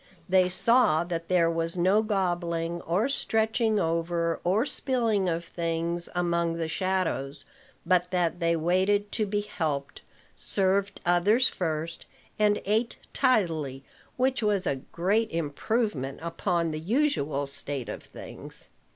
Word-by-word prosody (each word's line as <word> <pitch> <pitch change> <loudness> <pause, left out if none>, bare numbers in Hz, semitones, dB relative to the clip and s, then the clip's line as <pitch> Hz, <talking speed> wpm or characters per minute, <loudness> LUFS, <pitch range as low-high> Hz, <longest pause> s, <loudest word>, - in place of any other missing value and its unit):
They 185 -1 +4
saw 215 -4 +3
that 170 -1 -4
there 170 -2 +3
was 165 +1 -1
no 190 +5 +4
gobbling, 175 -5 -1
or 185 +9 0
stretching 220 -4 +1
over, 165 0 0
or 195 +8 +2
spilling 230 -10 0
of 170 0 -2
things, 170 0 -2
among 170 -1 +1
the 165 -1 -2
shadows; 160 -6 -1 0.4
but 180 -1 +2
that 175 -1 0
they 170 -1 +2
waited 190 +5 +1
to 215 -2 0
be 205 +1 0
helped, 155 -9 -3 0.3
served 195 +1 +1
others 200 +9 +4
first, 165 -1 -3 0.3
and 210 -1 +3
ate 220 +4 0 0.2
tidily, 160 - +1 0.3
which 260 0 +1
was 205 -3 +1
a 140 - 0
great 205 +6 +1
improvement 160 - -2
upon 170 0 -1
the 155 - -4
usual 165 - 0
state 140 -2 -4
of - - -6
things. - - -11
175 Hz, 130 wpm, -27 LUFS, 165-205 Hz, 0.4 s, They